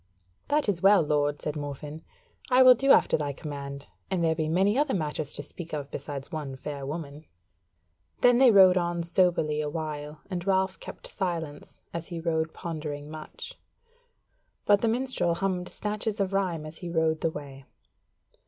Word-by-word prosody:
"That 295 Hz, -2 st, +1 dB
is 185 Hz, -4 st, 0 dB
well, 195 Hz, -2 st, +6 dB
lord," 145 Hz, -1 st, 0 dB
said 150 Hz, -, -2 dB
Morfinn, 145 Hz, +1 st, -6 dB, 0.5 s
"I 255 Hz, 0 st, +6 dB
will 255 Hz, 0 st, +10 dB
do 270 Hz, +3 st, -1 dB
after -, -, +5 dB
thy 145 Hz, -2 st, -2 dB
command; 140 Hz, -1 st, -7 dB, 0.2 s
and 180 Hz, -3 st, 0 dB
there 160 Hz, -1 st, +3 dB
be 155 Hz, -1 st, -2 dB
many 190 Hz, +6 st, +3 dB
other 285 Hz, -2 st, +2 dB
matters 150 Hz, -3 st, -2 dB
to 145 Hz, -, -5 dB
speak 170 Hz, +3 st, -9 dB
of 145 Hz, -2 st, -6 dB
besides 140 Hz, +2 st, -6 dB
one 150 Hz, -5 st, -4 dB
fair 140 Hz, 0 st, -6 dB
woman." 150 Hz, 0 st, -6 dB, 1.0 s
Then 245 Hz, 0 st, +6 dB
they 265 Hz, -1 st, +8 dB
rode 190 Hz, -4 st, +7 dB
on 175 Hz, -1 st, 0 dB
soberly 170 Hz, -3 st, +2 dB
a 150 Hz, -, -2 dB
while, 150 Hz, -1 st, -5 dB
and 180 Hz, -1 st, -5 dB
Ralph 190 Hz, -1 st, +1 dB
kept -, -, -10 dB
silence, 165 Hz, -6 st, -4 dB
as 170 Hz, 0 st, -5 dB
he 170 Hz, -2 st, -5 dB
rode 160 Hz, -1 st, -1 dB
pondering 150 Hz, -3 st, -6 dB
much; 155 Hz, -1 st, -9 dB, 1.1 s
but 205 Hz, -1 st, +5 dB
the 230 Hz, -, +2 dB
minstrel 235 Hz, -7 st, +1 dB
hummed 180 Hz, -1 st, -2 dB
snatches 210 Hz, 0 st, -3 dB
of 195 Hz, -1 st, 0 dB
rhyme 180 Hz, -5 st, 0 dB
as 155 Hz, +1 st, -9 dB
he 175 Hz, -, -6 dB
rode 160 Hz, -1 st, +1 dB
the 165 Hz, -, +2 dB
way. 140 Hz, -3 st, -9 dB
165 Hz, 170 wpm, -27 LUFS, 150-190 Hz, 1.1 s, will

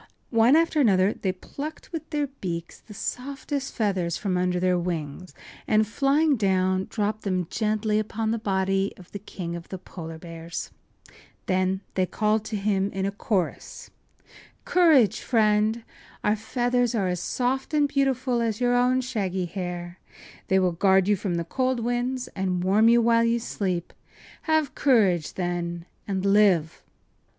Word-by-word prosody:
One 230 Hz, +4 st, +5 dB
after 325 Hz, -2 st, +3 dB
another 195 Hz, -4 st, +4 dB
they 190 Hz, -, -2 dB
plucked 285 Hz, +11 st, -8 dB
with 320 Hz, -2 st, -6 dB
their 295 Hz, -2 st, 0 dB
beaks 175 Hz, -11 st, -6 dB
the 210 Hz, -, -14 dB
softest 270 Hz, +4 st, -4 dB
feathers 190 Hz, -6 st, 0 dB
from 195 Hz, -3 st, -2 dB
under 180 Hz, 0 st, +1 dB
their 180 Hz, 0 st, +2 dB
wings, 170 Hz, 0 st, -5 dB, 0.3 s
and, 215 Hz, 0 st, +3 dB
flying 280 Hz, +5 st, +2 dB
down, 190 Hz, -2 st, +1 dB
dropped 215 Hz, 0 st, -2 dB
then 185 Hz, -3 st, -1 dB
gently 215 Hz, -1 st, 0 dB
upon 220 Hz, +1 st, -2 dB
the 230 Hz, -, -1 dB
body 195 Hz, -1 st, 0 dB
of 180 Hz, -, -15 dB
the 200 Hz, -, -6 dB
King 175 Hz, -4 st, -6 dB
of 170 Hz, -1 st, -9 dB
the 190 Hz, -, -5 dB
Polar 165 Hz, -3 st, -9 dB
Bears. 165 Hz, 0 st, -7 dB, 0.7 s
Then 185 Hz, +1 st, 0 dB
they 185 Hz, -1 st, +1 dB
called 215 Hz, +2 st, 0 dB
to 215 Hz, -, -4 dB
him 195 Hz, -1 st, 0 dB
in 190 Hz, 0 st, -2 dB
a 195 Hz, -, 0 dB
chorus: 200 Hz, -3 st, -3 dB, 0.7 s
“Courage, 320 Hz, -, +4 dB
friend! 220 Hz, 0 st, +2 dB, 0.4 s
Our 210 Hz, -, +3 dB
feathers 245 Hz, +2 st, 0 dB
are 200 Hz, -4 st, +1 dB
as 180 Hz, -1 st, -1 dB
soft 255 Hz, -, -1 dB
and 295 Hz, -2 st, +3 dB
beautiful 265 Hz, -3 st, 0 dB
as 225 Hz, -2 st, -1 dB
your 245 Hz, 0 st, +2 dB
own 250 Hz, +1 st, +3 dB
shaggy 195 Hz, -8 st, -2 dB
hair. 175 Hz, -1 st, -6 dB, 0.5 s
They 190 Hz, -, +3 dB
will 185 Hz, -1 st, +3 dB
guard 190 Hz, +2 st, +3 dB
you 205 Hz, -, +4 dB
from 190 Hz, -2 st, -3 dB
the 170 Hz, 0 st, -2 dB
cold 255 Hz, +6 st, 0 dB
winds 245 Hz, +2 st, -2 dB
and 185 Hz, -2 st, -2 dB
warm 210 Hz, +5 st, +4 dB
you 235 Hz, 0 st, +5 dB
while 230 Hz, 0 st, +4 dB
you 230 Hz, 0 st, +2 dB
sleep. 185 Hz, -6 st, -3 dB, 0.6 s
Have 315 Hz, -2 st, +2 dB
courage, 200 Hz, -, +2 dB
then, 175 Hz, -1 st, -3 dB, 0.2 s
and 195 Hz, -1 st, -2 dB
live! 195 Hz, -6 st, +3 dB
205 Hz, 160 wpm, -25 LUFS, 185-245 Hz, 0.7 s, One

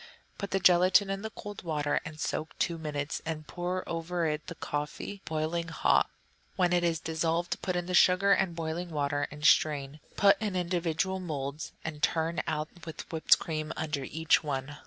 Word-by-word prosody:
Put 200 Hz, -, -3 dB
the 195 Hz, -, +1 dB
gelatine 185 Hz, +2 st, +5 dB
in 195 Hz, 0 st, -3 dB
the 220 Hz, -, -4 dB
cold 205 Hz, -1 st, -8 dB
water 150 Hz, -3 st, 0 dB
and 155 Hz, 0 st, -8 dB
soak 155 Hz, +1 st, -3 dB
two 170 Hz, -1 st, 0 dB
minutes, 150 Hz, -2 st, -3 dB
and 155 Hz, -1 st, -4 dB
pour 180 Hz, +3 st, -3 dB
over 170 Hz, +1 st, -2 dB
it 150 Hz, -1 st, -2 dB
the 170 Hz, -, -6 dB
coffee, 150 Hz, +7 st, -4 dB
boiling 160 Hz, +2 st, -1 dB
hot. 165 Hz, -, +2 dB, 0.5 s
When 180 Hz, -2 st, +2 dB
it 175 Hz, 0 st, +3 dB
is 165 Hz, -2 st, +1 dB
dissolved, 165 Hz, +2 st, -1 dB
put 185 Hz, -, -1 dB
in 175 Hz, 0 st, -1 dB
the 180 Hz, -, -4 dB
sugar 185 Hz, +2 st, +5 dB
and 190 Hz, -3 st, +3 dB
boiling 165 Hz, +2 st, -3 dB
water 145 Hz, -2 st, -1 dB
and 150 Hz, +1 st, -7 dB
strain; 150 Hz, -2 st, +3 dB, 0.2 s
put 200 Hz, 0 st, +5 dB
in 210 Hz, -3 st, -1 dB
little 180 Hz, -, +1 dB
individual 175 Hz, +1 st, -1 dB
moulds, 150 Hz, -4 st, -4 dB
and 155 Hz, -2 st, -5 dB
turn 165 Hz, +1 st, +1 dB
out 155 Hz, -1 st, -1 dB
with 160 Hz, -2 st, -8 dB
whipped 160 Hz, -, +5 dB
cream 155 Hz, -1 st, -4 dB
under 150 Hz, -3 st, -2 dB
each 160 Hz, +3 st, +2 dB
one. 145 Hz, 0 st, -3 dB
165 Hz, 185 wpm, -30 LUFS, 155-180 Hz, 0.5 s, gelatine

